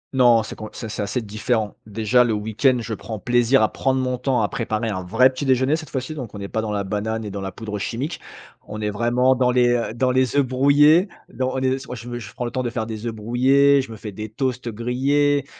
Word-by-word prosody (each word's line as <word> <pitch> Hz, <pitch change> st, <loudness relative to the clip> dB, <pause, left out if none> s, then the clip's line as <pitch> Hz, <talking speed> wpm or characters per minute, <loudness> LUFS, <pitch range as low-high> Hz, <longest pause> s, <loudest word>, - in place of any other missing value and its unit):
Non, 120 Hz, -3 st, +5 dB
c'est 110 Hz, -, -8 dB
com 110 Hz, -, -7 dB
c'est 110 Hz, -, -7 dB
c'est 110 Hz, -, -4 dB
assez 110 Hz, +5 st, -2 dB
différent. 110 Hz, +1 st, -2 dB
Déjà 110 Hz, +4 st, +2 dB
le 115 Hz, -, 0 dB
week-end, 110 Hz, +5 st, +1 dB
je 115 Hz, 0 st, -5 dB
prends 110 Hz, +1 st, -6 dB
plaisir 120 Hz, +3 st, +3 dB
à 110 Hz, -, +1 dB
prendre 130 Hz, 0 st, 0 dB
mon 125 Hz, -1 st, -1 dB
temps 125 Hz, -1 st, 0 dB
à 105 Hz, -, 0 dB
préparer 110 Hz, -1 st, -2 dB
un 95 Hz, -3 st, -3 dB
vrai 115 Hz, +8 st, +4 dB
petit 130 Hz, +2 st, -5 dB
déjeuner 130 Hz, +3 st, +2 dB
cette 155 Hz, -3 st, -9 dB
fois-ci. 130 Hz, +4 st, -4 dB
Donc 120 Hz, -8 st, -7 dB
on 100 Hz, -, -7 dB
est 100 Hz, -, -6 dB
pas -, -, -2 dB
dans 110 Hz, -1 st, -3 dB
la 100 Hz, -1 st, -1 dB
banane 105 Hz, +3 st, -3 dB
et 105 Hz, -, -6 dB
dans 100 Hz, -, -5 dB
la 95 Hz, -1 st, -5 dB
poudre 105 Hz, -2 st, -6 dB
chimique. 125 Hz, -, -4 dB, 0.5 s
On 105 Hz, +1 st, -6 dB
est 105 Hz, -, -1 dB
vraiment 120 Hz, +5 st, +2 dB
dans 125 Hz, -1 st, +2 dB
les, 125 Hz, -1 st, +3 dB
heu, 120 Hz, -2 st, 0 dB
dans 125 Hz, +2 st, +1 dB
les 130 Hz, 0 st, +1 dB
œufs 140 Hz, -1 st, +4 dB
brouillés. 145 Hz, -, +4 dB, 0.2 s
Don 130 Hz, 0 st, -2 dB
on 130 Hz, -, -1 dB
est 130 Hz, 0 st, +1 dB
s 135 Hz, 0 st, -9 dB
moi -, -, -6 dB
je 120 Hz, 0 st, -6 dB
je 105 Hz, -4 st, -10 dB
prends 125 Hz, -, -5 dB
le 120 Hz, -, -3 dB
temps 130 Hz, -, -2 dB
de 120 Hz, -, -2 dB
faire 115 Hz, -1 st, -3 dB
des 110 Hz, 0 st, -6 dB
œufs 115 Hz, -, -2 dB
brouillés, 135 Hz, +6 st, +3 dB
je 130 Hz, -, -9 dB
me 110 Hz, -, -8 dB
fais 105 Hz, 0 st, -8 dB
des 110 Hz, +2 st, -6 dB
toasts 125 Hz, +2 st, -3 dB
grillés, 140 Hz, +5 st, +1 dB
120 Hz, 260 wpm, -22 LUFS, 110-130 Hz, 0.5 s, Non